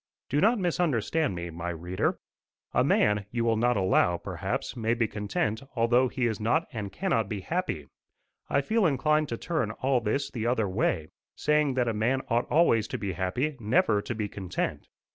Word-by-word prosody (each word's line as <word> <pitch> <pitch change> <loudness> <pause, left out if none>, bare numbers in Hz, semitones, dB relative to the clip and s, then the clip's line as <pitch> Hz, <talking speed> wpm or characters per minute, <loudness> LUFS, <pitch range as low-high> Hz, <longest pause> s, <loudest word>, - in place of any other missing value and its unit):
Do 145 - +1
not 225 +5 +4
misunderstand 160 - 0
me, 85 0 -5
my 85 +2 -4
reader. 85 +2 -1 0.6
A - - +4
man, 105 -1 +2
you 115 0 -1
will 115 0 +2
allow, 95 -6 +3
perhaps, - - -4
may 115 0 0
be 115 -2 +1
content 105 +1 -2
although 120 +2 +3
he 125 0 -1
is 110 -3 -1
not 120 +10 +1
and 105 -4 -4
cannot 115 - 0
be 105 -3 -3
happy: 160 - -2 0.6
I 140 - +2
feel 215 +5 +2
inclined 150 +1 +2
to 115 - -3
turn 155 -8 -1
all 130 +3 0
this 135 +6 -1
the 115 -3 -2
other 115 -4 +1
way, 80 -4 0 0.3
saying 150 -3 +2
that 125 -2 +1
a 115 - +1
man 120 +5 +1
ought 120 +1 +1
always 115 -9 +3
to - - -4
be 100 -2 -3
happy, 95 - -1
never 105 -1 +2
to 120 - -4
be 105 -1 -2
content. 95 -3 -4
115 Hz, 180 wpm, -28 LUFS, 105-140 Hz, 0.6 s, not